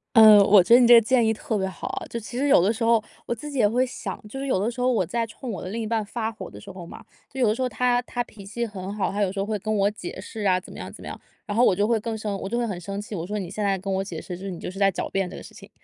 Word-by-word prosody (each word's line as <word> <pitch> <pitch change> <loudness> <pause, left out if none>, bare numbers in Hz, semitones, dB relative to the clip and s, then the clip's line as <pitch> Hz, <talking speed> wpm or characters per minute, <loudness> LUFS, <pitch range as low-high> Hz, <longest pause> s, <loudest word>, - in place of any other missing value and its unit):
嗯， 215 -2 +10
我 200 -1 +7
觉 230 +6 +4
得 245 - +9
你 240 - +5
这 240 - +9
个 230 - +8
建 240 +1 +3
议 220 - +3
特 220 0 -3
别 190 - 0
好。 185 - -5
就 235 - -4
其 235 +2 -8
实 285 - +1
有 275 - +6
的 205 +5 +2
时 230 - -4
候， 230 -1 +3 0.2
我 240 - -1
自 295 +6 -8
己 275 - -3
也 210 - +5
会 250 +4 +2
想， 255 - -6
就 270 +6 -7
是 275 - -4
有 255 - +2
的 220 +5 0
时 245 +1 -6
候 255 - +3
我 215 -7 +1
在 230 +6 -2
冲 235 +2 -7
我 190 - -5
的 185 - -6
另 225 +4 -4
一 - - -3
半 220 0 0
发 220 +1 -3
火 220 - -9
的 - - -11
时 200 -2 -10
候 180 -2 -9
嘛， - - -11 0.3
就 265 - -7
有 245 - +4
的 215 - +3
时 260 - -5
候 255 - +1
他 245 +1 +1
他 245 0 -3
脾 210 -4 -14
气 235 +4 -3
很 195 -2 -6
好， 205 - -1
他 205 +1 -2
有 190 -2 +1
时 195 - -5
候 195 - 0
会 210 -1 -2
跟 215 +2 -2
我 200 0 +2
解 190 -3 -8
释 215 +3 -8
啊， 185 -3 +3
怎 185 - -13
么 - - -9
样 - - -7
怎 - - -13
么 - - -8
样， - - -7 0.3
然 205 -2 -4
后 240 - +4
我 195 - +5
就 205 +2 +2
会 230 -2 +2
更 225 0 -4
生 210 -2 -3
我 195 - -4
就 235 - -1
会 240 - 0
很 190 -5 -4
生 200 +3 -5
气。 210 +1 -8
我 170 -2 -4
说： 210 +1 -3
“你 190 - -4
现 215 - -3
在 195 -1 +1
跟 195 +1 -4
我 190 - 0
解 175 -5 -6
释， 180 - -7
就 185 - -10
是 - - -3
你 170 - -7
就 - - -5
是 195 - -9
在 195 -1 +4
狡 - - -3
辩 195 -2 -1
这 - - -9
个 - - -9
事 - - -13
情。” - - -13
215 Hz, 400 characters per minute, -24 LUFS, 195-235 Hz, 0.3 s, 嗯